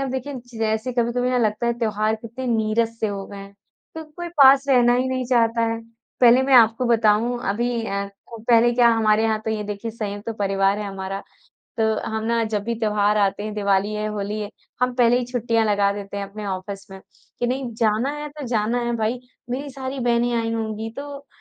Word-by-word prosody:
अब 270 -2 -2
देखें 265 +1 -4 0.2
जैसे 220 +3 -1
कभी-कभी 245 +1 0
ना 250 - +2
लगता 220 0 0
है 235 - +2
त्योहार 215 -1 0
कितने 230 +4 -7
नीरस 225 0 0
से 220 - +1
हो 200 -1 -4
गए 200 - -10
हैं, 200 0 -11 0.4
क 320 - -6
कोई 345 0 -5
पास 270 +1 +7
रहना 245 -2 +5
ही 255 +1 +1
नहीं 255 -1 -1
चाहता 230 -2 +2
है। 230 - -4 0.4
पहले 245 +1 +7
मैं 265 0 +2
आपको 230 +1 +5
बताऊँ 230 +1 +2
अभी 235 +2 -1
अ, 200 0 -3 0.2
को 230 - -10
पहले 235 0 +5
क्या 240 -1 +5
हमारे 220 -1 +3
यहाँ 220 -1 +1
तो 220 - -1
ये 215 -1 -2
देखिए 205 +2 -5
संयुक्त 205 -2 -6
तो 230 - -2
परिवार 195 -1 +1
है 210 - -4
हमारा। 195 0 -5 0.6
तो 220 - +3 0.3
हम 220 0 -3
ना 230 0 +1
जब 215 -2 -2
भी 235 +1 -1
त्योहार 210 -1 +2
आते 200 0 +1
हैं, 215 - -4
दिवाली 200 0 +1
है, 210 0 -2
होली 210 0 -3
है, 205 -1 -5 0.3
हम 250 0 +2
पहले 245 0 +4
ही 250 - -2
छुट्टियाँ 235 -2 0
लगा 205 -1 +2
देते 200 0 -7
हैं 200 - -2
अपने 205 +1 -8
ऑफिस 195 +1 -6
में, 190 0 -10 0.4
कि 245 - 0
नहीं 255 0 -2
जाना 225 +4 +1
है 295 0 -5
तो 285 - -5
जाना 230 0 0
है 240 0 -1
भाई। 225 +2 -1 0.3
मेरी 275 +3 -3
सारी 265 0 -6
बहनें 240 0 +1
आई 225 0 -2
होंगी 220 0 -3
तो 280 0 -8
225 Hz, 215 wpm, -22 LUFS, 210-245 Hz, 0.6 s, पास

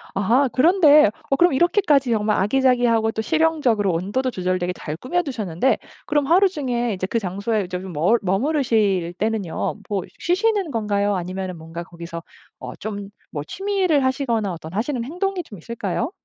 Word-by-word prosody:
아 230 +8 +3
그런데 305 - +6 0.3
그럼 350 +1 +5
어 - - +1
이렇게까지 295 - +3
정말 210 -1 +1
아기자기하고 240 0 +2
또 220 - -3
실용적으로 290 - +2
온도도 200 +10 -1
조절되게 180 -2 -1
잘 155 -3 -6
꾸며 350 - -1
두셨는데 225 - 0 0.3
그럼 295 -2 +1
하루 370 +5 +5
중에 245 - -2
이제 185 -1 -3
그 230 - 0
장소에 200 +2 -2
이제 180 0 -4
좀 190 -1 -7
머 165 +9 +3
머무르실 205 - +1
때는요, 210 -2 -2
뭐 200 -3 -1 0.2
쉬시는 390 -1 +1
건가요 205 -3 0
아니면은 185 0 -4
뭔가 165 +1 -7
거기서 170 -1 -8 0.4
어 - - -7
좀 205 -2 -6 0.2
뭐 145 -2 -4
취미를 375 - 0
하시거나 235 -7 0
어떤 160 -1 -9
하시는 235 +4 -1
행동이 360 +7 -2
좀 210 -10 -12
있을까요? 225 - -3
225 Hz, 375 characters per minute, -22 LUFS, 190-285 Hz, 0.4 s, 그런데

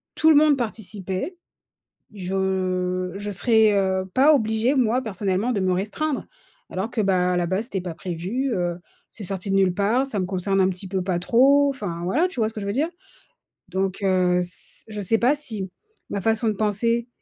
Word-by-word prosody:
tout 315 - +4
le 315 - +7
monde 295 0 +6
participait, 215 - -4 0.8
je 185 -1 -1
je 205 +1 -4
serais, 220 +1 +4
heu, 190 -1 +1
pas 290 +4 +6
obligée, 225 +1 +1
moi, 250 -1 +2
personnellement, 200 +1 -1
de 205 - -1
me 185 -1 +1
restreindre 220 +11 -2 0.4
alors 190 +5 -3
que, 235 - -2
bah, 180 -3 +2
à - - 0
la 175 - +1
base, 190 +5 -1
c'était 195 -6 -3
pas 175 -2 -5
prévu, 185 +10 -3
heu, 175 -2 -1 0.3
c'est 220 - -9
sorti 195 +1 -3
de 195 - +3
nulle 190 -2 +3
part. 215 +7 +2
Ça 215 -7 -3
me 185 - -1
concerne 195 +1 0
un 185 - +4
petit 185 +1 -5
peu 190 0 -1
pas 180 -1 -1
trop. 275 +8 +4
Enfin 190 -11 -5
voilà, 265 - +2
tu 360 - -5
vois 215 - +2
ce 220 - -10
que 215 - -5
je 200 - -5
veux 200 - -1
dire? 290 +8 0 0.8
Donc 190 +1 -1
heu, 185 -2 +3
c 180 +1 -4
je 210 -1 -5
sais 225 +4 +2
pas 250 +5 +3
si 220 -10 -4 0.4
ma 200 - -2
façon 225 +2 +1
de 215 - +1
penser 230 +3 0
200 Hz, 200 wpm, -23 LUFS, 185-235 Hz, 0.8 s, le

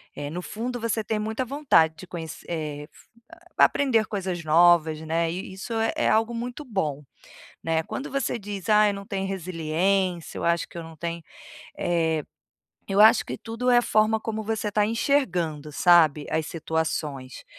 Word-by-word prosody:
eh, 145 0 -5
no 175 +3 -5
fundo 245 +3 -4
você 225 -1 -1
tem 220 +1 -2
muita 220 +4 -2
vontade 250 - +2
de 185 - -10
conhe 170 -2 -7 0.2
eh, 150 -3 -4
fu - - -20 0.3
hã, - - -23 0.2
pra - - +8
aprender 235 -6 +1
coisas 185 -4 -3
novas, 160 0 +4
né, 165 +1 0
e 175 - -4
e - - -9
isso 195 +5 -6 0.2
é - - +1
algo 225 +2 +2
muito 245 +5 -5
bom, 155 - -2 0.6
né, 160 0 0
quando 275 - -6
você 275 -3 -1
diz: 200 -1 -6
"Ai 210 0 +5
eu - - -1
não 200 0 -8
tenho 195 -1 -3
resiliência, 180 0 -1
eu - - -5
acho 170 -1 +1
que - - -12
eu - - -7
não 165 0 -11
tenho" 170 +1 -4 0.6
eh, 160 -3 0 0.7
eu 195 +1 0
acho 220 +1 +6
que - - -4
tudo 230 +2 -3
é 245 - +6
a - - +5
forma 220 +1 +2
como 220 0 -4
você 215 -1 -2
tá 210 0 +2
enxergando, 180 - 0
sabe. 155 -3 +4
As 160 0 -1
situações. 155 -5 -3
185 Hz, 185 wpm, -25 LUFS, 160-220 Hz, 0.7 s, pra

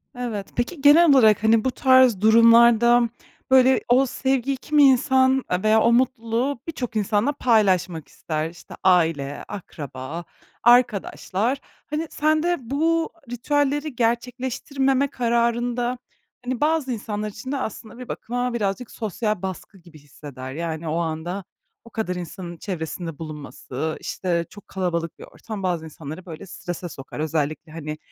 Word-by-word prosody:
Evet. 230 -5 -4
Peki, 260 +6 -2
genel 305 +4 +7
olarak, 220 -7 +5
hani, 220 0 +4
bu 260 - +2
tarz 260 -6 +4
durumlarda, 230 +1 +6 0.4
böyle, 260 0 +5
o 255 +3 +5
sevgi, 265 +1 -1
kimi 295 +2 +3
insan 265 0 +4 0.2
veya 215 +1 +4
o 235 - +4
mutluluğu 245 +1 0
birçok 250 -8 -5
insanla 215 +5 +1
paylaşmak 190 - +1
ister. 155 0 -4
İşte, 170 +1 -13
aile, 165 -6 +2
akraba, 155 -5 -7 0.4
arkadaşlar. 240 0 +2 0.3
Hani, 305 +2 -2
sen 310 +1 +1
de 350 0 +1
bu 320 +7 0 0.2
ritüelleri 290 +3 0
gerçekleştirmeme 260 +3 0
kararında, 240 0 0 0.5
hani, 250 -1 -3
bazı 300 -3 +1
insanlar 215 -2 -3
için 215 +5 -8
de 285 - -1
aslında 220 -2 -6
bir 250 -1 -9
bakıma 245 +1 -3
birazcık 210 +1 -2
sosyal 215 -2 -3
baskı 190 +1 -6
gibi 170 -4 -16
hisseder. 140 -2 -10
Yani, 165 +1 -4
o 155 +1 -1
anda 170 +3 -3 0.4
o - - -13
kadar 220 -5 -3
insanın 175 0 -7
çevresinde 165 -3 -5
bulunması, 155 -1 -5
işte, 170 -2 -2
çok 205 - -14
kalabalık 170 -3 -3
bir - - -9
ortam 215 -3 -8
bazı 175 -3 -1
insanları, 155 +3 -9
böyle, 170 +2 -9
strese 175 -1 -6
sokar. 135 -1 -9
Özellikle, 155 0 -2
hani, 155 -1 -6
225 Hz, 135 wpm, -23 LUFS, 175-255 Hz, 0.5 s, genel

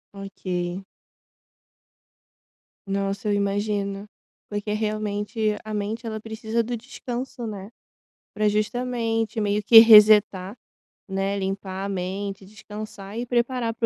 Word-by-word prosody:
Ok. 185 -2 -4 2.0
Nossa, 195 +2 -2
eu - - +2
imagino, 200 0 -1 0.4
porque 205 0 -3
realmente 215 0 -1
a 215 0 -6
mente 215 +3 -3
ela 220 -1 -4
precisa 220 +1 -2
do 240 +1 -3
descanso, 245 0 -6
né? 200 -1 -7 0.7
Pra 210 0 +2
justamente, 225 0 -1
meio 205 0 0
que 225 +2 +9
resetar, 210 -3 +7 0.5
né, 195 +1 -1
limpar 195 0 -4
a - - -3
mente, 195 +1 -4
descansar 210 0 -9
e 245 - -3
preparar 240 -1 0
para 230 - -1
210 Hz, 115 wpm, -24 LUFS, 195-225 Hz, 2.0 s, que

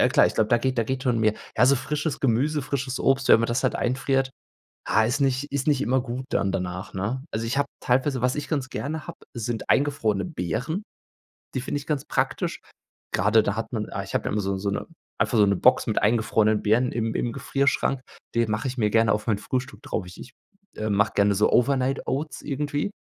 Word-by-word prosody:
ja - - +5
klar, - - +5
ich - - -3
glaube, 110 -1 +2
da 120 - +4
geht 130 +1 -1
da 115 - +2
geht 130 +3 -3
schon 125 -4 +1
mehr. 110 -1 +3 0.2
Ja, 125 - +5
so 140 +1 +5
frisches 150 +3 -2
Gemüse, 140 +4 +1
frisches 135 -1 -3
Obst, 135 0 +2
wenn - - +7
man 115 - +1
das 120 +3 -1
halt 130 - +2
einfriert, 135 +1 0 0.6
ha, 110 - +3
ist 125 +6 0
nicht 135 +1 0
ist 140 0 -2
nicht 145 -3 +3
immer 130 -1 +2
gut 125 +1 -5
dann 100 - +1
danach, 90 +1 -4
ne? 110 +8 -2
Also 110 +1 -2
ich 120 +4 -1
habe 140 0 +2
teilweise 130 +1 +1
was 125 +1 +1
ich 150 -1 -4
ganz 140 -4 -2
gerne 155 +3 -4
habe, 170 - -8 0.2
sind 115 -1 -4
eingefrorene 140 -8 +2
Beeren. 155 - -3 0.7
Die 130 - 0
finde 135 - -2
ich 145 - -12
ganz 145 -4 -1
praktisch. - - -1 0.5
Grade 105 +4 +4
da 105 - -1
hat 115 +1 -4
man 110 -3 -2
ah, 100 - -3
ich 100 - -9
habe - - 0
da - - -2
immer 105 - 0
so 95 0 -1
so 100 +1 -2
'ne 100 - -2 0.3
einfach 120 - +1
so 105 - +6
'ne 100 0 +2
Box - - +4
mit - - +1
eingefrorenen 110 -1 +2
Beeren 120 +4 +2
im 115 -1 -1
im 120 - -1
Gefrierschrank. 135 0 0 0.3
Die 115 0 +3
mache 110 +4 -1
ich 130 0 -4
mir 105 -3 +2
gerne 115 0 +3
auf 105 +2 -3
mein 110 -3 +2
Frühstück 130 +5 -4
drauf. 95 - -3
Ich 90 0 -12
ich, - - -10 0.4
äh, 110 0 -3
mache 105 +2 +2
gerne 100 0 +3
so 105 +2 +3
Overnight 135 +1 +2
Oats 150 +4 -3
irgendwie. 145 +5 -2
125 Hz, 230 wpm, -25 LUFS, 110-135 Hz, 0.7 s, wenn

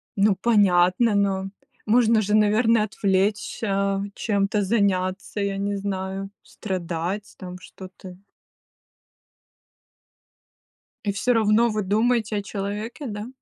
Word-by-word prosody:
Ну 200 0 +3
понятно, 200 0 +3
но 195 -1 0 0.4
можно 225 0 +3
же 210 +1 -2
наверное 215 +1 +3
отвлечься, 200 0 -1
чем-то 205 -1 0
заняться, 195 -1 -1
я 200 -1 -2
не 200 +1 -2
знаю, 195 0 -4
страдать 185 +1 -5
там 180 0 -9
что-то. 185 0 -12 2.9
И 200 - +1
всё 245 +5 0
равно 225 +1 +3
вы 215 -2 -2
думаете 220 +1 +1
о - - -1
человеке, 205 +7 -5
да? 210 0 -6
200 Hz, 105 wpm, -23 LUFS, 190-215 Hz, 2.9 s, Ну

